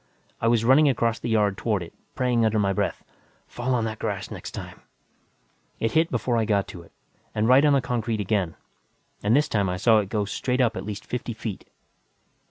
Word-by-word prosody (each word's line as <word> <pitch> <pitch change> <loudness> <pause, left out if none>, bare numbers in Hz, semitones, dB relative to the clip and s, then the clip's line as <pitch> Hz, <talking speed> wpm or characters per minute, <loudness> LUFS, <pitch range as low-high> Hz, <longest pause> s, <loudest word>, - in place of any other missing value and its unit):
I 115 - +2
was 115 -1 +3
running 140 +4 +6
across 115 -3 0
the - - -4
yard 105 -3 +1
toward 105 -6 0
it, 85 - -12 0.2
praying 125 -2 +1
under 110 0 +2
my 100 -2 +2
breath, - - -2 0.4
Fall 125 +1 -2
on 115 -2 0
that 110 -1 -4
grass - - -3
next - - -7
time. - - -9 1.0
It 115 - 0
hit 160 +1 +2
before 120 0 0
I 115 - +2
got 100 -2 +1
to 85 - -9
it, 85 - -18 0.4
and 110 +1 +1
right 130 +3 +6
on 150 -1 +5
the 140 - +3
concrete 115 -3 -2
again, 100 -4 -1 0.7
and 105 +4 +3
this 150 +1 +3
time 100 -8 0
I 90 - -2
saw 110 +3 +4
it 100 -2 -3
go 105 -1 0
straight 125 +5 -2
up 120 -3 +2
at - - -5
least 105 -1 -6
fifty 125 -1 -4
feet. 110 -3 -6
115 Hz, 210 wpm, -25 LUFS, 105-125 Hz, 1.0 s, running